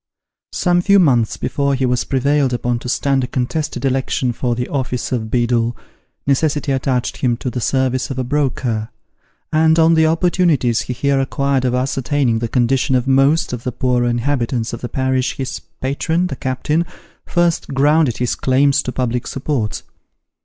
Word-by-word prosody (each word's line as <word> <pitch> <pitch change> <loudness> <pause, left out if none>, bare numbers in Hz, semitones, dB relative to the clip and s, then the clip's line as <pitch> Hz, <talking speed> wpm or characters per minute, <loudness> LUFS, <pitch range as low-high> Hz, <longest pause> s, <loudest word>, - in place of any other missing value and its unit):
Some 175 -1 +1
few 200 +2 +4
months 125 - +3
before 140 +2 0
he 130 0 0
was 125 -1 0
prevailed 135 0 +1
upon 120 0 -1
to 125 - -6
stand 135 +1 +1
a - - -2
contested 135 +1 -2
election 130 -1 0
for 120 0 -2
the 125 +1 -3
office 130 -3 -3
of 110 -4 -2
beadle, 120 0 0 0.5
necessity 145 +1 +1
attached 130 -2 -1
him 120 -2 0
to 125 - -4
the 125 - -4
service 130 0 0
of 135 - -5
a 130 - -1
broker; 125 -5 -1 0.6
and 160 +1 +4
on 165 0 +5
the 160 -1 +4
opportunities 165 -7 +2
he 125 - -4
here 140 +2 +1
acquired 135 -1 0
of 125 0 +1
ascertaining 130 -1 0
the 115 - -2
condition 130 +3 +1
of 125 -1 +1
most 135 +3 +3
of 120 - -4
the 125 - -2
poorer 125 0 0
inhabitants 120 -1 -1
of 115 - -6
the 120 - -4
parish, 130 -1 -1
his 130 -1 -4 0.2
patron, 160 +6 0
the 145 - -4
captain, 130 +6 -1 0.4
first 175 -1 +1
grounded 145 -1 +2
his 125 -1 0
claims 140 +2 +2
to 125 - -4
public 125 -1 -2
support. 130 -6 -3
130 Hz, 170 wpm, -18 LUFS, 125-145 Hz, 0.6 s, on